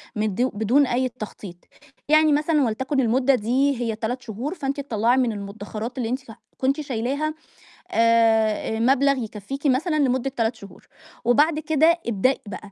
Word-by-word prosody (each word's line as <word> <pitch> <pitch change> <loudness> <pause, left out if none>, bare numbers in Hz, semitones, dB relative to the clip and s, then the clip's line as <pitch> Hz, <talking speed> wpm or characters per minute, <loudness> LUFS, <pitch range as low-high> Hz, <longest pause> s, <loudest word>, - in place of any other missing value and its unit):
مد 215 +1 -1
بدون 255 +3 +2
أي 255 +1 0
تخطيط. 210 -6 -9 0.5
يعني 310 0 +5
مثلًا 300 0 +2
ولتكن 265 +5 -1
الُمدة 255 +3 +3
دي 250 +3 0
هي 225 -2 -1
3 240 +4 -3
شهور، 240 - -5
فأنتِ 280 -4 -3
تطلّعي 240 -2 +1
من 245 -3 +2
المدخرات 210 +4 -6
اللي 230 -3 -2
أنتِ 255 +2 -1
ف 265 -4 -14 0.3
كنتِ 275 +3 0
شايلاها، 280 +4 -2 0.6
آآ، 225 -1 +2
مبلغ 270 +3 +3
يكفيكِ 225 +7 -5
مثلًا 305 +5 +1
لمدة 260 -1 +1
3 230 -3 -1
شهور. 200 -3 -14 0.4
وبعد 295 +6 +3
كده 315 +2 +3
ابدئي 235 +5 +1
بقى، 200 0 -8
250 Hz, 150 wpm, -23 LUFS, 220-280 Hz, 0.6 s, يعني